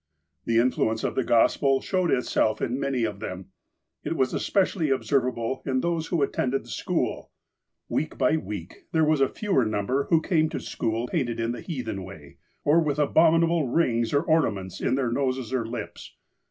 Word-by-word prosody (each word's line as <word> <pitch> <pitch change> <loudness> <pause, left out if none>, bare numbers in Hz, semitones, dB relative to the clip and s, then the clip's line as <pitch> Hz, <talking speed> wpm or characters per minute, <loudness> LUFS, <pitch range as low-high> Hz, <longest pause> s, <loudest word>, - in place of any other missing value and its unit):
The 115 - +1
influence 115 -2 +1
of - - -1
the 130 - 0
Gospel 135 +4 +3
showed 185 +1 0
itself 120 -4 +1
in 125 +3 -2
many 135 -3 -1
of 105 -3 -2
them. 95 -1 -7 0.5
It - - -2
was 130 -4 +1
especially 185 -5 +1
observable 130 -2 0
in 130 -2 0
those 165 0 -1
who 165 -5 +1
at - - -1
tended 130 -1 0
the 120 - -15
school. - - -2 0.6
Week 155 - -2
by 155 - +3
week, 100 - -6
there 160 -1 +4
was 155 -2 +2
a 135 - +4
fewer 195 - +1
number 110 +6 0
who 165 - +3
came 160 -1 +1
to - - -4
school 115 +1 -2
painted 120 -7 -2
in 115 +1 0
the 120 - -6
heathen 120 - -4
way, 80 -7 -12 0.3
or 150 +3 +4
with 150 -3 0
the 150 - +3
abominable 165 0 +3
rings 120 -5 +1
or 145 - +2
ornaments 100 - 0
in - - +1
their 130 -3 0
noses 130 -1 -1
or 120 -3 -1
lips. 120 +1 -7
130 Hz, 185 wpm, -26 LUFS, 115-155 Hz, 0.6 s, there